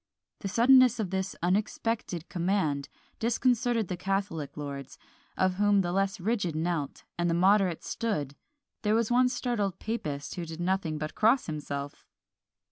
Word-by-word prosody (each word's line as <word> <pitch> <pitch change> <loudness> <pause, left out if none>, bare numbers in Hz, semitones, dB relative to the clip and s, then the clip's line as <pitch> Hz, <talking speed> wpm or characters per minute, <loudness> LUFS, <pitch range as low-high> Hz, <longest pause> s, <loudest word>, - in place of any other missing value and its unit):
The 200 - -4
suddenness 245 +3 +5
of 195 -5 -2
this 190 0 -2
unexpected 195 -1 -1
command 170 -6 0 0.3
disconcerted 240 -1 +1
the 180 - -3
catholic 185 -6 -2
lords, 140 -2 -6 0.4
of 185 0 +2
whom 205 -1 +4
the 175 -2 -2
less 195 +1 0
rigid 195 -4 -1
knelt, 160 -3 -2 0.2
and 175 0 +2
the 165 - +2
moderate 190 -1 +3
stood: 150 -12 -2 0.5
there 210 0 +2
was 230 0 +1
one 250 +1 +4
startled 240 -6 -1
papist 150 -11 -4
who 175 - -4
did 160 +1 -7
nothing 175 -3 0
but 155 0 -4
cross 230 +5 +3
himself! 145 -2 -5
190 Hz, 145 wpm, -29 LUFS, 160-220 Hz, 0.5 s, suddenness